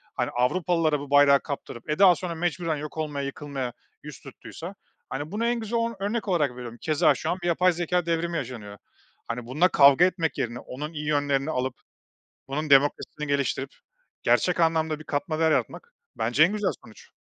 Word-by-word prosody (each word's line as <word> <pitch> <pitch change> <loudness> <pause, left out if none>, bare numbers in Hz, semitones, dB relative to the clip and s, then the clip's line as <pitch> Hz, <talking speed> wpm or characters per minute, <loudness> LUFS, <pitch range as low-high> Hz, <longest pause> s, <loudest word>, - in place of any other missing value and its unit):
hani, - - -1
Avrupalılara 155 +3 +1
bu 140 -1 -8
bayrağı 145 -1 +6
kaptırıp, 140 -3 -7
e, 155 - -2
daha 185 -3 +7
sonra 170 -1 -5
mecburen 170 -1 -1
yok 150 +2 -7
olmaya, 145 -3 -3
yıkılmaya 140 -3 -5 0.3
yüz - - -9
tuttuysa, - - -10 0.3
hani, 145 +5 -5
bunu 225 +3 -1
en 240 0 +1
güzel 225 +1 -2
o 230 -1 -1
örnek 210 +3 -2
olarak 160 -8 +1
veriyorum. 120 -1 -9
Keza 155 -2 +3
şu - - -4
an 180 - -2
bir - - -1
yapay 180 +1 +3
zekâ 175 +1 -1
devrimi 170 0 -1
yaşanıyor. 115 -6 -6 0.5
Hani, 115 0 -4
bununla 155 +8 +3
kavga 140 +2 +6
etmek 165 -5 -1
yerine 120 0 -3
onun 150 +5 -7
iyi 150 -1 -5
yönlerini 145 -1 +1
alıp, 130 -2 -2 0.7
bunun 150 +2 -3
demokrasisini 145 +2 +2
geliştirip 140 -1 -1 0.5
gerçek 180 -1 +2
anlamda 160 -1 +1
bir - - -10
katma 155 +2 -2
değer 160 -1 +3
yaratmak 130 -7 -2 0.2
bence 120 +7 +3
en 175 - +3
güzel 205 -3 0
sonuç. 110 - -16
150 Hz, 180 wpm, -26 LUFS, 135-175 Hz, 0.7 s, daha